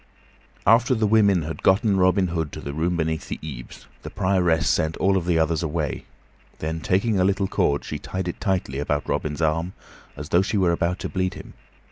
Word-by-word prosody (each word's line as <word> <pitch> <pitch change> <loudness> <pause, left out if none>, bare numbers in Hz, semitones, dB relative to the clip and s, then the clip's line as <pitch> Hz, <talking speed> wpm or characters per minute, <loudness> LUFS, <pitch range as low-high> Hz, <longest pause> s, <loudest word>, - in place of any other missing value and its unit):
After 120 +4 +4
the 110 -1 +1
women 100 -5 +4
had 80 +1 -6
gotten 100 +2 +3
Robin 95 0 +3
Hood 80 -4 -2
to - - -6
the 70 - -6
room 85 +3 -1
beneath 80 -1 -2
the - - -3
eaves, 65 -6 -9 0.2
the - - -7
Prioress 90 -4 +1
sent 80 +1 +1
all 95 +1 +2
of 90 -2 -1
the 85 -2 +2
others 80 -1 +1
away; 80 -2 -3 0.5
then, 80 +1 -3
taking 100 +4 +1
a - - +3
little 95 +1 +1
cord, 70 -5 0
she - - -5
tied 95 -1 -4
it 90 - -5
tightly 90 -9 -1
about 75 0 -2
Robin's 75 +1 -2
arm, 80 +4 0 0.4
as 75 +1 -7
though 85 - +4
she 105 +2 -1
were 90 -3 +3
about 85 +1 0
to - - -3
bleed 95 -1 -2
him. - - -11
90 Hz, 205 wpm, -23 LUFS, 80-95 Hz, 0.5 s, After